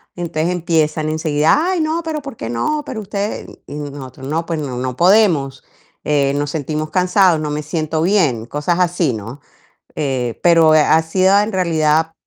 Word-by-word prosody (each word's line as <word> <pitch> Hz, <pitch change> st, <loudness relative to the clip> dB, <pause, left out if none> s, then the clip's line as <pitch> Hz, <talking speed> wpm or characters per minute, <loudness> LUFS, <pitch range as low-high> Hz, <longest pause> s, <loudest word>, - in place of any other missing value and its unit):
Entonces 170 Hz, -1 st, -2 dB
empiezan 160 Hz, -3 st, 0 dB
enseguida: 155 Hz, 0 st, +1 dB, 0.2 s
"Ay, 365 Hz, -3 st, 0 dB
no, 315 Hz, +2 st, -1 dB
pero 315 Hz, -2 st, -4 dB
¿por 275 Hz, -4 st, -8 dB
qué 115 Hz, -, -5 dB
no? 295 Hz, -, -1 dB
Pero 225 Hz, -6 st, -5 dB
ustedes". 205 Hz, +1 st, -4 dB, 0.2 s
Y -, -, -8 dB
nosotros: 140 Hz, -3 st, -8 dB
"No, 160 Hz, +3 st, -2 dB
pues 165 Hz, -2 st, -3 dB
no 140 Hz, -4 st, -4 dB
no 125 Hz, 0 st, -4 dB
podemos, 170 Hz, -8 st, +3 dB, 0.4 s
eh, 140 Hz, -2 st, +1 dB
nos 145 Hz, 0 st, -2 dB
sentimos 155 Hz, 0 st, -3 dB
cansados, 185 Hz, -2 st, +3 dB
no 155 Hz, -1 st, -3 dB
me 150 Hz, +1 st, -3 dB
siento 155 Hz, +1 st, -2 dB
bien", 160 Hz, -, +1 dB
cosas 150 Hz, +6 st, -1 dB
así, 175 Hz, -5 st, +1 dB
¿no? 110 Hz, +5 st, -7 dB, 0.6 s
Eh, 130 Hz, -5 st, -2 dB
pero, 165 Hz, -2 st, +5 dB
eh, -, -, +6 dB
ha 160 Hz, +2 st, +4 dB
sido 185 Hz, +4 st, +3 dB
en 210 Hz, +2 st, 0 dB
realidad 160 Hz, -3 st, +1 dB
160 Hz, 175 wpm, -18 LUFS, 145-180 Hz, 0.6 s, eh